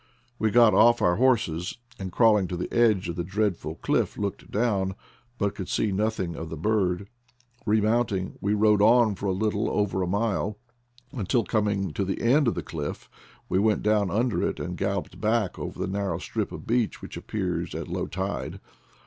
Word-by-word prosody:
We 110 - +2
got 115 -1 +6
off 120 +4 +6
our 90 0 +2
horses, 105 -8 +1 0.2
and 95 -1 -5
crawling 105 -4 +4
to 90 - -4
the 90 - -5
edge 110 -6 +3
of 85 - -3
the 85 - -1
dreadful 95 -4 -1
cliff - - 0
looked 100 -2 -4
down, 100 -4 0 0.4
but 100 -1 0
could 95 - -6
see 105 - +1
nothing 95 -4 -1
of 80 - -6
the 80 - -6
bird. 100 +1 0 0.6
Remounting 110 -2 +1
we 100 +1 +1
rode 105 -1 +4
on 115 0 +5
for 100 +1 -4
a - - +2
little 105 +2 0
over 100 -2 0
a 90 - 0
mile, 105 +1 -1 0.5
until 120 -2 0
coming 100 -5 0
to 100 - -1
the 95 0 -2
end 135 +4 +3
of 115 - +1
the - - -3
cliff 75 -3 -6 0.4
we 95 - +1
went 105 +1 +2
down 105 -2 +2
under 115 +5 0
it - - -1
and 90 0 -4
galloped 100 0 -3
back 110 -2 0
over - - -5
the - - -2
narrow 95 -3 -2
strip 90 - -3
of - - -8
beach 120 -1 0
which - - -8
appears 90 -5 -3
at - - -4
low - - -3
tide. 95 +2 -4
100 Hz, 190 wpm, -26 LUFS, 95-110 Hz, 0.6 s, got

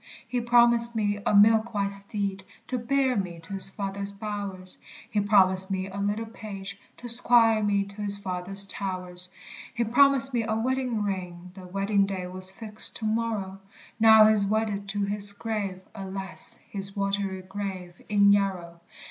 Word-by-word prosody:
He 245 +1 -2
promised 235 0 +4
me 205 -2 -1
a - - +2
milk 220 +2 +4
white 200 -1 -1
steed, 200 -1 -3 0.3
To 255 - -2
bear 260 +2 0
me 180 -4 -4
to 165 +4 -10
his 195 0 +1
father's 200 0 -5
bowers; 200 -3 -6 0.3
He 215 -3 -1
promised 190 -2 +4
me 190 0 -3
a 195 - -9
little 205 +3 -2
page, 200 -3 -9 0.2
To 245 - -9
'squire 230 -2 +4
me 205 -1 +1
to 200 +1 -11
his 200 -1 -3
father's 195 0 -3
towers; 185 -2 -5 0.5
He 235 - 0
promised 270 +3 +6
me 240 - +1
a 220 0 -2
wedding 250 -1 -1
ring, 180 -3 -5
The 185 -1 -12
wedding 195 +1 0
day 190 -2 -5
was 185 +1 0
fixed 215 +2 -3
to 220 - -5
morrow; 215 -3 -2 0.4
Now 220 -1 +7
he 215 - +5
is 200 -2 +1
wedded 210 -1 -2
to 205 +1 -2
his 200 0 +4
grave, 200 -3 -4
Alas, 190 0 +2
his 195 0 -3
watery 195 -1 -2
grave, 190 -2 -7
in 200 -1 +4
Yarrow! 185 -4 -2
200 Hz, 165 wpm, -26 LUFS, 195-220 Hz, 0.5 s, Now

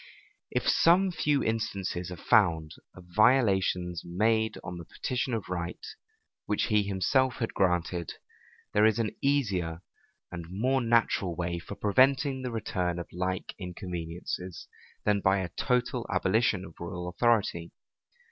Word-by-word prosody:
If - - -1
some 185 +3 +4
few 150 -4 +1
instances 100 -5 -2
are 90 - -6
found 85 -6 +3 0.2
of 90 - -12
violations 95 -7 +3
made 110 +5 +1
on 90 -1 -6
the 85 - -9
petition 125 +7 -3
of 105 -4 -4
right, 85 -2 -3 0.7
which 105 - +1
he 105 -1 +4
himself 110 +7 +1
had 115 - -3
granted, 90 -2 0 0.6
there 105 +1 +5
is 110 - +2
an 115 -2 0
easier 95 - 0 0.5
and 85 -2 -7
more 125 +8 +1
natural 115 -6 +2
way 85 0 -2
for 95 +4 -8
preventing 130 +6 +3
the 130 - -3
return 90 -6 -2
of 85 - -6
like 90 +1 -3
inconveniencies, 90 -1 -6 0.4
than 105 -1 +3
by 95 +1 +3
a 95 -2 -2
total 125 +4 -1
abolition 100 -1 +1
of - - -12
royal 90 0 -5
authority. 90 -4 +1
95 Hz, 140 wpm, -29 LUFS, 90-115 Hz, 0.7 s, there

